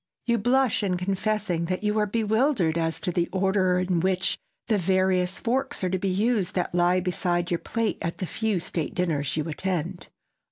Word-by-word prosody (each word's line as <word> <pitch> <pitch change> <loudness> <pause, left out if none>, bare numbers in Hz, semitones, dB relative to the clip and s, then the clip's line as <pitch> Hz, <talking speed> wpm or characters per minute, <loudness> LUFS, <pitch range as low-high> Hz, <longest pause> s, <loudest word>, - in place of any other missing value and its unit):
You 235 -1 +2
blush 250 +2 +2
in 185 -3 0
confessing 195 -1 -1
that 185 +3 -3
you 210 +1 +1
are 210 - +2
bewildered 220 - +1
as 165 -1 0
to 180 - -1
the 175 0 0
order 190 -1 +2
in 180 -1 +1
which 185 +1 +1 0.3
the 215 -4 +2
various 185 0 +1
forks 265 +1 -1
are 180 - 0
to 190 - 0
be 195 - -1
used 205 0 +1
that 180 -2 -1
lie 175 +1 +3
beside 175 -1 -1
your 170 - +1
plate 230 -1 -2
at 170 - -3
the 185 - -3
few 215 +1 -1
state 165 -3 -3
dinners 155 -6 0
you 155 - -1
attend. 175 +1 -3
185 Hz, 190 wpm, -26 LUFS, 175-210 Hz, 0.3 s, lie